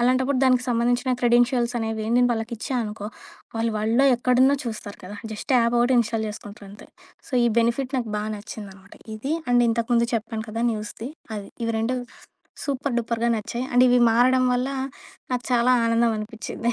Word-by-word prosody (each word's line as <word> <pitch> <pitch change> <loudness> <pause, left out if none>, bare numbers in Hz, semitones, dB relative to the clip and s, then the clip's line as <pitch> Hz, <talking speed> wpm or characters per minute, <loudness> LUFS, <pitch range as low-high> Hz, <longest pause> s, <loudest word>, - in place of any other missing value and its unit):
అలాంటప్పుడు 255 +2 +2
దానికి 255 -1 +3
సంబంధించిన 245 +2 +1
క్రెడెన్షియల్స్ 240 0 +3
అనేవి 220 -1 -3
నేను 245 0 +5
వాళ్ళకి 225 +1 -4
ఇచ్చా 260 +4 -4
అనుకో 210 -1 -6 0.5
వాళ్ళు 230 0 0
వరల్డ్‌లో 225 +5 +2
ఎక్కడున్న 255 +3 +4
చూస్తారు 215 -3 -6
కదా! 205 +3 -8 0.2
జస్ట్ 220 +5 -2
యాప్ 235 +1 +2
ఒకటి 245 +2 +3
ఇన్‌స్టాల్ 225 -1 -2
చేసుకుంటారంతే. 205 -1 -11 0.4
సో - - -17
ఈ - - +4
బెనిఫిట్ 235 +3 0
నాకు 235 -3 -4
బా 210 - -2
నచ్చిందనమాట. 200 -2 -10 0.2
ఇది 270 +8 -2 0.2
అండ్ 245 0 +5
ఇంతకుముందు 235 +1 +1
చెప్పాను 225 -1 -3
కదా! 225 +2 -3
న్యూస్ది 215 +2 -6 0.3
అది. 200 -1 -7 0.2
ఇవి 230 0 -1
2 245 +3 0 0.7
సూపర్ 280 -2 -2
డూపర్‌గా 235 0 -1
నచ్చాయి. 235 +3 -4
అండ్ 245 +1 +6
ఇవి 245 0 +4
మారడం 255 +2 +4
వల్ల 250 +2 0 0.6
నాకు 245 -1 -1
చాలా 240 +1 +3 0.2
ఆనందం 230 0 +2
అనిపిచ్చింది. 225 +2 -4
235 Hz, 160 wpm, -24 LUFS, 220-250 Hz, 0.7 s, అండ్